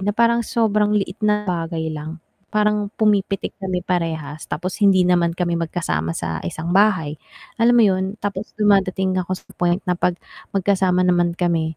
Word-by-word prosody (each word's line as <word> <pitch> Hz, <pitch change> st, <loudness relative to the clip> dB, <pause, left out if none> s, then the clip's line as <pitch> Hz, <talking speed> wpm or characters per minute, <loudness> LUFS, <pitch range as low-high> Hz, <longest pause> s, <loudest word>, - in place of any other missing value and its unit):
na 205 Hz, -, +1 dB
parang 235 Hz, 0 st, +3 dB
sobrang 210 Hz, -2 st, +1 dB
liit 195 Hz, 0 st, -3 dB
na 210 Hz, 0 st, +1 dB
bagay 165 Hz, -3 st, -2 dB
lang 155 Hz, +2 st, -7 dB, 0.2 s
parang 210 Hz, -1 st, +1 dB
pumipitik 205 Hz, -2 st, +1 dB
kami 185 Hz, -2 st, -2 dB
parehas 160 Hz, -4 st, -3 dB
tapos 175 Hz, +5 st, -4 dB
hindi 195 Hz, -2 st, +5 dB
naman 175 Hz, -2 st, +2 dB
kami 175 Hz, -1 st, 0 dB
magkasama 85 Hz, -, -2 dB
sa 80 Hz, -1 st, -3 dB
isang 160 Hz, -, -4 dB
bahay, 185 Hz, -7 st, +2 dB, 0.4 s
alam 240 Hz, +1 st, +5 dB
mo 235 Hz, -, +6 dB
'yun 190 Hz, +1 st, 0 dB
tapos 205 Hz, 0 st, -4 dB
dumadating 190 Hz, -2 st, +2 dB
ako 185 Hz, +1 st, -2 dB
sa -, -, -14 dB
point 175 Hz, +2 st, +1 dB
na 180 Hz, -, +1 dB
'pag 180 Hz, -, +1 dB, 0.4 s
magkasama 190 Hz, -1 st, +2 dB
naman 175 Hz, -1 st, +2 dB
kami, 165 Hz, -3 st, 0 dB
185 Hz, 165 wpm, -21 LUFS, 165-205 Hz, 0.4 s, mo